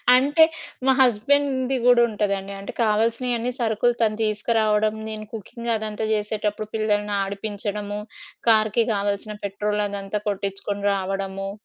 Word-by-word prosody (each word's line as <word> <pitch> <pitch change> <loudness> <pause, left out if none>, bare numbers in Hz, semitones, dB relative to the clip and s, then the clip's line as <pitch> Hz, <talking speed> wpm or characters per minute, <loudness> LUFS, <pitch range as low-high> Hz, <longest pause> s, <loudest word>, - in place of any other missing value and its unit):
అంటే 290 +5 +5 0.4
మా 265 - +6
హస్బెండ్‌ది 260 +2 +2
కూడా 245 -1 +6
ఉంటదండి. 200 -2 -2
అంటే 195 - -7
కావాల్సినయన్నీ 230 +3 +1
సరుకులు 230 +1 +2
తను 215 -2 +2
తీసుకురావడం. 215 0 +1 0.2
నేను 215 0 -6
కుకింగ్ 235 +3 -5
అదంతా 215 0 -3
చేసేటప్పుడు 210 0 -2
పిల్లల్ని 210 -1 0
ఆడిపించడము. 205 +1 -4 0.5
కార్‌కి 220 +1 +4
కావాల్సిన 205 +1 -2
పెట్రోల్ 210 +1 -1
అదంతా 200 +1 -3
కొట్టించుకొని 200 0 -3
రావడము. 195 0 -3
210 Hz, 115 wpm, -23 LUFS, 205-230 Hz, 0.5 s, మా